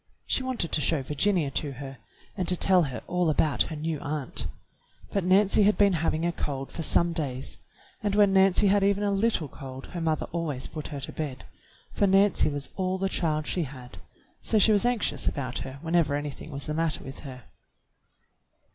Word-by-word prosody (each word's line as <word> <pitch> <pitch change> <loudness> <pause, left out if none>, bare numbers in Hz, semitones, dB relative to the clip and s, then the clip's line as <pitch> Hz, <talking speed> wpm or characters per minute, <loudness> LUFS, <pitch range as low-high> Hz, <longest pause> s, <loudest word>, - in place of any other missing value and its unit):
She - - 0
wanted 255 -10 -3
to 150 - 0
show 150 -2 +1
Virginia 150 +2 +1
to 140 0 -2
her, 135 -1 -9 0.4
and 185 -4 -2
to 180 - +6
tell 185 0 +5
her 130 -3 -6
all 180 -2 +1
about 155 -1 +2
her 160 - -5
new 155 0 -3
aunt; 145 -2 -3 0.6
but 200 - 0
Nancy 195 +3 +4
had 210 +1 +4
been 200 -2 +4
having 165 0 0
a 175 - +1
cold 135 -5 -4
for - - -5
some 170 +2 +2
days, 135 -6 -3 0.4
and 205 -2 0
when 205 -2 +5
Nancy 190 +1 +5
had 200 0 +4
even 200 +1 +2
a 205 - +1
little 200 -5 +1
cold 135 -1 -9
her 175 - -4
mother 160 -1 0
always 155 -6 -3
put 155 -2 -6
her 145 -3 -6
to 135 - -5
bed, 145 -5 -5 0.5
for 200 - +2
Nancy 195 -2 +4
was 145 -1 -5
all 185 0 0
the 195 0 -1
child 155 -4 0
she 180 - -1
had, 130 -2 -11 0.4
so 220 - +1
she 215 +1 +5
was 210 +3 +3
anxious 245 -3 0
about 130 -4 -2
her 130 +1 -7
whenever 165 -3 +2
anything 145 +1 -5
was 140 -2 -5
the 150 - -3
matter 165 0 -1
with 135 +1 -8
her. 130 -4 -9
165 Hz, 200 wpm, -27 LUFS, 145-195 Hz, 0.6 s, to